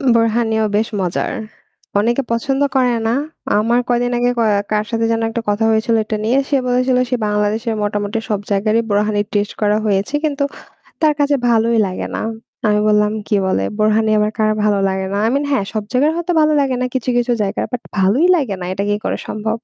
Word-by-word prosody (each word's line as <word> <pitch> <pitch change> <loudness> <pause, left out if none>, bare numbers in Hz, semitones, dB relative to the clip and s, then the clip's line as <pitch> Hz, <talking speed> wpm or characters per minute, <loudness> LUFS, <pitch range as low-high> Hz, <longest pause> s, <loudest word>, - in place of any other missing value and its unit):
বোরহানিও 225 -1 +2
বেশ 215 +2 +1
মজার। 180 -1 -1 0.7
অনেকে 240 +6 +1
পছন্দ 265 +4 0
করে 250 -2 +3
না। 230 - +1 0.4
আমার 235 +3 +2
কয়দিন 245 0 +1
আগে 245 0 +2
ক - - +3 0.3
কার 215 0 +1
সাথে 230 0 0
যেন 230 0 0
একটা 230 +1 -3
কথা 205 +2 +1
হয়েছিল 220 +1 +1
এটা 215 0 -3
নিয়ে। 250 +5 +3
সে 280 - +3
বলেছিল 250 +1 +2
সে 250 - +1
বাংলাদেশের 210 +2 0
মোটামুটি 205 +1 -1
সব 210 - 0
জায়গারই 215 +3 +2
বোরহানির 205 0 +1
taste 205 0 +1
করা 210 0 +3
হয়েছে 205 +7 0
কিন্তু 285 -2 -1 0.6
তার 305 -1 +4
কাছে 285 0 +3 0.2
ভালোই 230 0 +3
লাগে 185 -1 -4
না। - - -3 0.5
আমি 210 0 +3
বললাম, 210 0 +3 0.2
"কি 210 - +2
বলে? 95 - 0
বোরহানি 215 +1 +2
আবার 210 0 +1
কার 215 0 +2
ভালো 205 -1 +2
লাগে 190 0 -2
না?" 200 - -1
I - - +3
mean 280 +1 0
হ্যাঁ, 270 -8 +1
সব 215 -1 -2
জায়গার 280 +5 +3
হয়তো 345 +1 -1
ভালো 305 0 +3
লাগে 270 -2 +1
না - - +1
কিছু, 255 0 -1
কিছু 245 0 +1
জায়গার। 200 +1 -2
বাট 245 - -3 0.2
ভালোই 210 - +3
লাগে 260 - -1
না - - -4
এটা 200 +1 -2
কি 205 - +2
করে - - -1
সম্ভব? 215 +1 -3
220 Hz, 200 wpm, -18 LUFS, 210-245 Hz, 0.7 s, তার